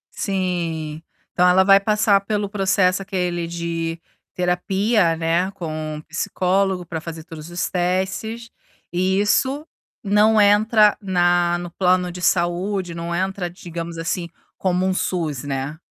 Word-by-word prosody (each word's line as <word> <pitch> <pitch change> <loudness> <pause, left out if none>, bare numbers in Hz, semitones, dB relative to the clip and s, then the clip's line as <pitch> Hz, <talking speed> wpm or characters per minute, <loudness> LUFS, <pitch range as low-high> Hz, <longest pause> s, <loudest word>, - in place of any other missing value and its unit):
Sim. 170 -6 -2 0.3
Então 180 - +4
ela 185 +1 +5
vai 195 0 +7
passar 210 0 +3
pelo 205 0 -2
processo, 195 -2 +1
aquele 180 -3 -2
de 170 -1 -3 0.4
terapia, 180 +1 +1
né, 165 +3 0
com 155 -4 -5
psicólogo 185 +2 0
pra 160 -1 -5
fazer 160 -1 -7
todos 160 -1 -10
os 175 +1 -2
testes 190 +6 -2 0.4
e 185 +2 +1
isso 265 +8 +1 0.4
não 210 +2 +4
entra 210 +1 +5
na 175 -2 +2
no 175 -1 -7
plano 180 0 +1
de 180 0 -8
saúde, 180 +1 0
não 170 0 -4
entra, 190 -1 -2
digamos 170 -2 -7
assim, 170 +1 -2 0.3
como 185 0 0
um 190 - +1
SUS, 160 -8 -2
né? 140 +2 -4
180 Hz, 130 wpm, -21 LUFS, 170-195 Hz, 0.4 s, vai